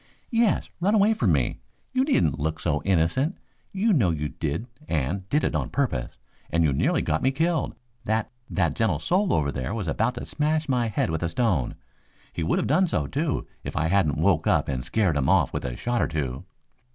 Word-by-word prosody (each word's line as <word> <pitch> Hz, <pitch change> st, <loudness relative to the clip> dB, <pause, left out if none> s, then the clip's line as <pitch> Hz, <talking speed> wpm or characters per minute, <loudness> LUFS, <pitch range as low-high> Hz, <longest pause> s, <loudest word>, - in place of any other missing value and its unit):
"Yes, 230 Hz, -3 st, +2 dB
run 200 Hz, +5 st, +2 dB
away 210 Hz, +1 st, +5 dB
from 115 Hz, -, +1 dB
me. 70 Hz, -6 st, +1 dB, 0.3 s
You 260 Hz, 0 st, +3 dB
needn't 265 Hz, -, +2 dB
look 80 Hz, +2 st, -2 dB
so 75 Hz, -3 st, 0 dB
innocent. 95 Hz, -, +1 dB, 0.3 s
You 205 Hz, +3 st, +2 dB
know 115 Hz, -, +3 dB
you 75 Hz, -3 st, -1 dB
did 80 Hz, +9 st, -3 dB, 0.2 s
and 80 Hz, +4 st, 0 dB
you -, -, -14 dB
did 150 Hz, +6 st, +2 dB
it -, -, 0 dB
on -, -, -1 dB
purpose, 70 Hz, -, -2 dB, 0.3 s
and 85 Hz, +1 st, +2 dB
you 75 Hz, -3 st, +3 dB
nearly -, -, +1 dB
got 80 Hz, -, 0 dB
me 130 Hz, -, +3 dB
killed. 160 Hz, +2 st, 0 dB, 0.3 s
That 110 Hz, +1 st, 0 dB, 0.2 s
that 85 Hz, -6 st, +1 dB
gentle 105 Hz, -6 st, +1 dB
soul 185 Hz, -, +1 dB
over 70 Hz, -2 st, +1 dB
there 65 Hz, -, -3 dB
was 105 Hz, -6 st, -3 dB
about 115 Hz, +9 st, 0 dB
to 120 Hz, -, -5 dB
smash 155 Hz, +1 st, 0 dB
my 125 Hz, -3 st, +1 dB
head 105 Hz, -6 st, 0 dB
with 80 Hz, -, -2 dB
a 85 Hz, -, 0 dB
stone. 90 Hz, -, 0 dB, 0.6 s
He -, -, -4 dB
would 80 Hz, -, +1 dB
have -, -, 0 dB
done 180 Hz, +7 st, +3 dB
so, -, -, 0 dB
too, 145 Hz, 0 st, -1 dB, 0.2 s
if -, -, -5 dB
I 80 Hz, +2 st, +1 dB
hadn't 90 Hz, -6 st, +2 dB
woke 80 Hz, +1 st, +2 dB
up -, -, +3 dB
and 65 Hz, -3 st, -2 dB
scared 100 Hz, -8 st, +1 dB
him 65 Hz, -2 st, +1 dB
off -, -, +3 dB
with -, -, -3 dB
a 60 Hz, -1 st, -3 dB
shot 120 Hz, -, -1 dB
or -, -, +2 dB
two." 70 Hz, -5 st, -3 dB
100 Hz, 215 wpm, -25 LUFS, -, 0.6 s, away